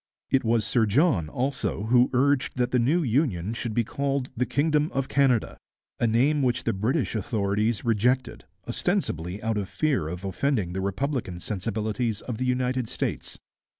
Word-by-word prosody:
' - - -68
It 135 0 +3
was 115 -2 +2
Sir 115 -3 +2
John 105 - +2
also 130 - -2
who 120 +3 +4
urged 135 +1 +1
that 125 0 +1
the 125 - +3
new 155 +9 +2
union 115 - 0
should 120 -2 -3
be 120 - +3
called 140 +2 -2
the 125 +2 0
'Kingdom 150 +2 +1
of 135 -1 0
Canada,' 135 -5 +2 0.4
a 120 - +2
name 135 +7 +3
which 125 -2 +1
the 115 - 0
British 120 +9 0
authorities 105 +1 0
rejected, 120 +3 +1 0.2
ostensibly 90 +6 -1
out 110 -1 0
of 100 - -4
fear 145 - 0
of 90 +4 -6
offending 100 -3 -1
the 95 - -2
republican 100 -1 -2
sensibilities 110 +3 -2
of 120 -3 -5
the 130 - 0
United 125 -1 0
States. - - -3
120 Hz, 170 wpm, -26 LUFS, 105-135 Hz, 0.4 s, who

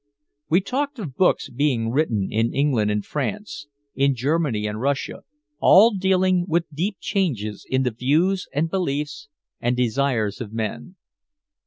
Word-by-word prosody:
We 170 +4 +4
talked 280 +7 -2
of 160 - -6
books 185 - +2
being 120 -4 0
written 115 -8 0
in 115 +2 0
England 135 -7 +2
and 105 0 -1
France, 150 +1 -4 0.3
in 140 0 +2
Germany 135 -4 0
and 105 +1 -3
Russia, 140 +1 -2 0.4
all 215 +4 +7
dealing 185 -1 +2
with 170 -1 +1
deep 185 +6 -2
changes 120 - -2
in 130 0 +1
the 125 - 0
views 155 - +1
and 150 +4 0
beliefs 150 -5 -3 0.3
and 120 +1 0
desires 120 -4 0
of 110 -4 -6
men. 115 - -4
140 Hz, 145 wpm, -23 LUFS, 115-180 Hz, 0.4 s, all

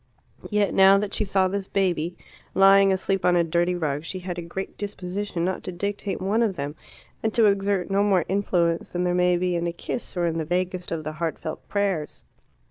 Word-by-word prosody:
Yet 210 -2 +1
now 195 +1 +7
that 200 0 -2
she - - +1
saw 195 -2 +2
this 195 0 -3
baby, 175 -3 0 0.4
lying 195 0 +6
asleep 190 0 0
on 180 0 +4
a 170 - +4
dirty 170 +2 +1
rug, 150 -4 -2
she 185 - -5
had 180 -1 -5
a - - -3
great 180 +3 -6
disposition 200 -2 -4
not 185 0 -2
to 185 - -3
dictate 200 +2 -3
one 200 +5 +1
of 215 -5 +1
them, 145 -1 -4 0.5
and 220 - 0
to 230 - +5
exert 200 -2 +1
no 200 +1 +3
more 195 -5 +3
influence 175 -4 0
than 180 0 0
there 180 0 +1
may 180 0 +3
be 180 0 0
in 170 0 -1
a - - -1
kiss 180 +3 -6
or 175 - +1
in 165 -1 -1
the - - -1
vaguest 180 +2 -2
of 165 -2 -3
the 155 - -4
heartfelt 155 0 -5
prayers. 195 -7 -1
185 Hz, 215 wpm, -25 LUFS, 170-195 Hz, 0.5 s, now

